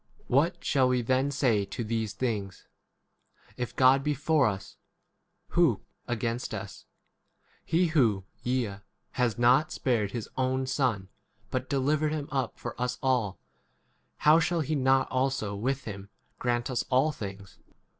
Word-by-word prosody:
81 - - -3
What 170 +5 +2
shall 135 -3 +3
we 125 -1 +1
then 130 +3 +2
say 125 -7 +2
to 115 - -5
these 110 -1 -2
things? 105 -6 -3 0.9
If 125 -1 -4
God 135 +1 +5
[be] 150 0 0
for 155 0 +3
us, 100 -2 -5 0.7
who 170 -9 +4 0.3
32 - - -5
against 115 +1 -2
us? - - -8 0.8
He 175 +3 +2
who, 115 - +2 0.2
yea, 120 -6 -1 0.3
has 125 -3 0
not 125 +6 +4
spared 115 -6 0
his 115 -1 -5
own 130 0 0
Son, 125 -8 0 0.4
but 130 0 -2
delivered 150 +3 +1
him 150 -2 -3
up 135 -2 -2
for - - -5
us 125 0 -1
all, 120 -7 +1 0.8
how 155 +2 +6
shall 170 0 +1
he 155 +1 -2
not 135 -2 +3
also 130 -6 0
with 130 +6 -1
him 100 -2 -7 0.3
grant 120 0 0
us 125 - 0
all 135 +4 +3
things 100 -8 -8
130 Hz, 150 wpm, -28 LUFS, 115-140 Hz, 0.9 s, how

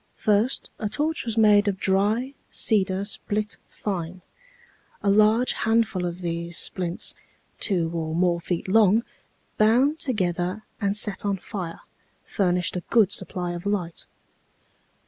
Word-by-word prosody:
First, 215 +4 +1
a 210 - -2
torch 305 +5 -1
was 230 -1 -2
made 210 -1 +5
of 195 -2 0
dry 205 +8 +1 0.2
cedar 195 -3 +2
split 210 0 -2
fine. 180 -3 -5 0.8
A 200 - +3
large 215 +4 +4
handful 220 -5 +1
of 175 +1 -6
these 170 0 -3
splints, 175 -2 -1 0.5
two 170 -5 0
or 160 -1 -3
more 175 0 +2
feet 175 +1 -3
long, 215 +2 +4 0.6
bound 250 +8 +4
together 185 -4 -1 0.2
and 200 0 0
set 210 -1 -3
on 200 -1 0
fire, 180 -3 -6 0.4
furnished 180 -3 0
a 180 - -2
good 215 -4 +4
supply 180 -2 0
of 175 +2 -5
light. 180 -5 -2
200 Hz, 130 wpm, -25 LUFS, 175-215 Hz, 0.8 s, made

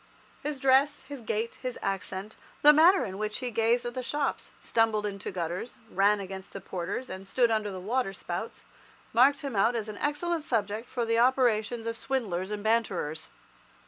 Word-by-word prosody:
His 295 -1 -3
dress, 270 +2 +3
his 285 -3 -8
gait, 225 +1 -3
his 255 -2 -4
accent, 195 +1 -3 0.3
the 300 +1 +10
manner 320 -1 +6
in 190 -1 -6
which 215 0 -2
he 250 -1 -3
gazed 230 +2 +2
at 240 - -3
the 255 - -3
shops, 280 +2 -2
stumbled 225 -2 +1
into 200 -2 -4
gutters, 180 +4 -4
ran 200 +2 +3
against 190 -1 -7
the - - -5
porters, 190 +8 -4
and 190 +1 -8
stood 240 +3 +2
under 215 -2 0
the 190 -2 -6
waterspouts, 210 +1 -3 0.5
marked 275 +6 +5
him 275 -5 -4
out 225 +5 +3
as 220 -2 -2
an 210 - -7
excellent 320 +3 -1
subject 220 -4 -2
for 240 -2 -1
the 230 0 +2
operations 240 -3 +2
of 230 0 -2
swindlers 205 -8 -2
and 210 0 -5
banterers. 195 -9 0
225 Hz, 175 wpm, -29 LUFS, 200-255 Hz, 0.5 s, the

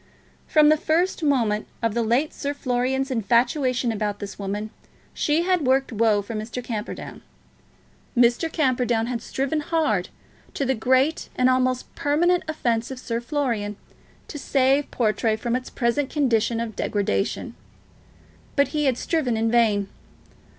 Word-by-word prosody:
From 300 -1 +5
the 310 - +5
first 340 +5 0
moment 235 -8 +1 0.2
of 230 -2 +1
the 235 - 0
late 240 +7 +1
Sir 285 0 -3
Florian's 265 +1 -1
infatuation 245 +2 +1
about 210 -2 -2
this 205 0 -8
woman, 205 +2 -4 0.4
she 310 +3 +1
had 365 -1 +2
worked 265 +1 +2
woe 220 -2 +2
for 230 - -7
Mr. 225 +3 -5
Camperdown. 225 -2 -6 1.0
Mr. 245 +7 +3
Camperdown 245 -7 +1
had 240 -1 -3
striven 275 +3 -2
hard, 295 - 0 0.5
to 275 - -1
the 265 - +2
great 260 +6 +1
and 255 0 +3
almost 255 0 0
permanent 345 +5 +2
offence 235 -7 -1
of 265 - -6
Sir 235 -2 -3
Florian, 235 -7 -2 0.5
to 295 - -7
save 275 +1 +2
Portray 215 -1 +1
from 235 +2 -2
its 255 0 -4
present 260 +3 0
condition 235 -5 +1
of 230 -2 -4
degradation; 195 - -1 1.0
but 280 - +3
he 300 -1 -1
had 260 -3 +2
striven 265 -9 0
in 225 0 +1
vain. 215 -4 +3
250 Hz, 145 wpm, -24 LUFS, 225-285 Hz, 1.0 s, From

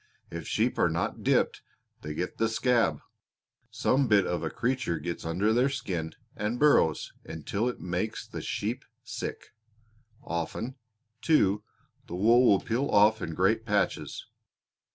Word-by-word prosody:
If 85 -3 -6
sheep - - 0
are - - +4
not - - -2
dipped - - +2 0.4
they 75 0 -6
get 90 +3 -4
the 115 - +2
'scab.' 110 - +2 0.7
Some 135 0 +1
bit 100 -4 +4
of 90 - -1
a 80 - -2
creature 125 -7 -1
gets 85 +3 -5
under 95 +7 +1
their 125 +4 +3
skin 95 -12 -3 0.2
and 105 +3 -2
burrows 130 - +3
until 100 +9 -2
it 125 - -6
makes 90 +5 -3
the - - -7
sheep - - -3 0.2
sick. - - -6 0.7
Often, 85 +9 -3 0.5
too, 105 -11 +3 0.5
the 85 - -5
wool 115 +6 +5
will 100 -3 +5
peel 125 +5 -1
off 105 +2 +5
in 80 -1 -4
great - - +2
patches. - - -1
105 Hz, 145 wpm, -28 LUFS, 85-120 Hz, 0.7 s, wool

